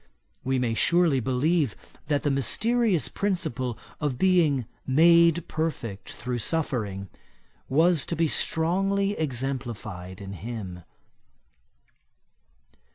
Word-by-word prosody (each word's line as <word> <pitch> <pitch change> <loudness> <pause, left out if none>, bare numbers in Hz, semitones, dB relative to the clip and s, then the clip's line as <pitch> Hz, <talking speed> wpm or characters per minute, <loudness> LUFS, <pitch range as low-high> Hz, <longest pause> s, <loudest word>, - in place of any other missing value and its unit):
We 130 +1 0
may 125 -2 0
surely 170 +2 +3
believe 135 +5 +1 0.3
that 145 -2 0
the 145 - +1
mysterious 195 - +2
principle 130 - -2 0.2
of 145 -4 -1
being 165 -9 +3 0.2
'made 170 +3 +5
perfect 135 -11 -4
through 120 0 -4
suffering' 110 -9 -2 0.6
was 160 +1 +3
to 170 - -1
be 165 0 +2
strongly 195 +6 +1
exemplified 120 - -4
in 100 -1 -7
him. 95 -2 -7
140 Hz, 95 wpm, -26 LUFS, 120-170 Hz, 0.6 s, made